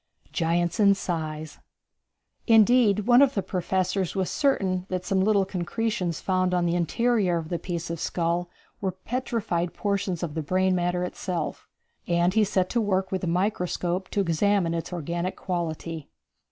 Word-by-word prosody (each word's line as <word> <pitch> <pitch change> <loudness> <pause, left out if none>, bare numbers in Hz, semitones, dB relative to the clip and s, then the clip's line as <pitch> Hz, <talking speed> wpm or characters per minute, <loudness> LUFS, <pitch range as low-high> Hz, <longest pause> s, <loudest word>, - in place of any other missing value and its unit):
Giants 170 +3 0
in 200 -1 +6
Size. 155 -4 -4 0.9
Indeed, 225 -2 +5
one 245 +1 +6
of 280 -1 +4
the 200 - 0
professors 185 0 -1
was 190 -2 -1
certain 190 -10 +1
that 185 -1 -3
some 195 -1 +1
little 200 -1 +3
concretions 185 -1 -2
found 185 -1 +1
on 175 -1 +1
the 170 - +1
interior 185 +2 +1
of 160 -1 -5
the 175 - -2
piece 170 -2 -4
of 170 - -4
skull 170 +1 -1 0.3
were 190 -2 -1
petrified 195 -5 -2
portions 200 -4 -1
of 160 -4 -3
the 160 - -2
brain 185 +5 +1
matter 175 0 0
itself, 180 -2 -4 0.4
and 175 +1 +2
he 220 0 +4
set 190 -2 +1
to 240 - +1
work 190 -2 0
with 190 - -1
the 180 - -2
microscope 180 0 -1
to 200 - 0
examine 180 0 +1
its 165 +1 -4
organic 170 +2 -3
quality. 165 -3 -4
185 Hz, 160 wpm, -26 LUFS, 170-200 Hz, 0.9 s, in